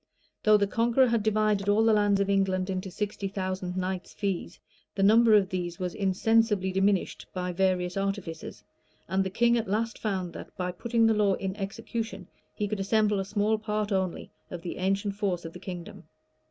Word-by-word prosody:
Though 215 0 +6
the 205 - +2
Conqueror 235 +5 +3
had 230 -1 +2
divided 210 -1 +1
all 210 +2 +4
the 225 - +5
lands 205 -1 +3
of 200 - +1
England 195 -1 +1
into 185 0 -3
sixty 205 +1 -3
thousand 185 -2 -3
knights' 185 0 -3
fees, 190 -3 -3 0.4
the 195 - 0
number 220 +2 +6
of 195 -3 +3
these 175 -2 -3
was 180 -1 -3
insensibly 205 0 +2
diminished 195 0 0
by 180 0 -2
various 180 -1 +1
artifices; 195 -4 -4 0.4
and 190 +2 +1
the 190 - -2
king 235 +4 +3
at 220 - -4
last 225 +3 -1
found 190 -5 -2
that, - - -10
by 180 -1 -2
putting 230 +5 +1
the 225 - +4
law 205 -2 +3
in 190 -1 -4
execution, 215 0 -5 0.3
he 210 - -1
could 210 0 -3
assemble 210 +1 +2
a 195 - -2
small 210 +2 +1
part 210 -1 -2
only 190 -2 -2 0.2
of 175 -1 -7
the 175 - -5
ancient 195 +2 -1
force 185 -5 -1
of 165 - -7
the 180 - -9
kingdom. 180 -2 -8
195 Hz, 190 wpm, -28 LUFS, 185-215 Hz, 0.4 s, Though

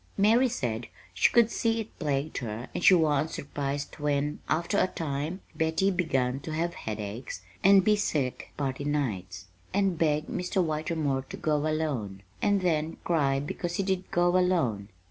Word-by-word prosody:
"Mary 225 +6 +5
said 120 - -3 0.3
she 95 - +4
could 235 -1 +4
see 230 0 +1
it 220 0 -7
plagued 145 -1 -1
her 115 -1 -5
and 180 - -3
she 190 - +8
wa'n't 155 -2 +2
surprised 145 -1 -4
when, 145 0 0
after 170 +6 +1
a - - +3
time, 155 +2 -3
Betty 160 +5 +1
begun 135 -8 0
to 155 +3 -6
have 170 +2 -1
headaches 105 -2 -6 0.2
and 195 0 +7
be 210 +2 +4
sick 150 -11 -2
party 140 -1 -2
nights, 95 -12 -2 0.3
and 195 -4 +1
beg 155 -1 +2
Mr. 180 +2 -2
Whitermore 155 -3 -1
to - - -6
go 150 -1 0
alone 130 -12 -2 0.2
and 200 -1 +2
then 160 -3 0
cry 140 -5 +2
because 170 +4 -4
he 195 - 0
did 190 -1 -1
go 175 +1 +2
alone. 160 - +1
155 Hz, 165 wpm, -28 LUFS, 135-180 Hz, 0.3 s, she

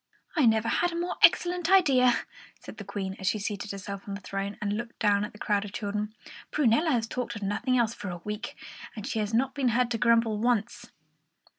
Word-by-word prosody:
"I 295 -7 +4
never 220 0 +3
had 350 +9 +1
a 335 - -3
more 350 +1 -3
excellent 350 0 +4
idea," 265 -10 +5 0.4
said - - -11
the - - -7
Queen, 190 -2 -4
as 190 - -4
she 215 - +2
seated 205 0 -4
herself 200 0 -6
on 200 - -4
the - - -6
throne 195 +2 -4
and 205 -1 -1
looked 235 +2 -6
down 205 -2 +2
at 210 - -5
the 210 - -14
crowd 205 -1 0
of 205 -1 -8
children. 210 0 -3 0.4
"Prunella 300 +3 +3
has 240 -6 +1
talked 245 +1 -4
of 210 - -6
nothing 230 +6 0
else 235 -2 +2
for 205 - -8
a - - -3
whole 175 - -8
week, 210 +3 -5 0.4
and 215 -2 -6
she 225 - -2
has 210 0 -1
not 260 +4 +1
been 275 -3 0
heard 240 +1 +2
to 230 - -1
grumble 230 -2 +3
once." 240 -1 0
225 Hz, 230 wpm, -28 LUFS, 205-250 Hz, 0.4 s, idea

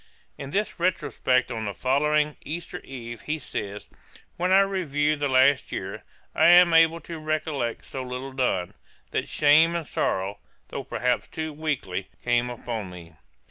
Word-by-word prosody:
In 140 0 -8
his 205 0 -1
retrospect 130 -8 +1
on 110 -2 -3
the 100 -2 -4
following 150 - +1
Easter 165 +3 -5
Eve, 120 -3 -8
he 155 +1 -2
says, 105 -7 -6 0.5
'When 180 +2 0
I 195 +1 +7
review 155 -7 0
the 145 -1 -1
last 130 +1 +4
year, - - -5 0.3
I - - +4
am 175 0 +7
able 165 0 +5
to 165 +1 -7
recollect 155 -6 -2
so 130 - -6
little 130 +1 -5
done, 110 -9 0 0.4
that - - -2
shame 155 +3 +5
and 170 -2 -2
sorrow, 100 -5 -1 0.3
though - - -5
perhaps 125 0 -1
too 155 -1 -5
weakly, 135 - -3 0.2
come 120 0 +2
upon 115 -4 -5
me.' 85 -2 -11
140 Hz, 155 wpm, -25 LUFS, 120-160 Hz, 0.5 s, I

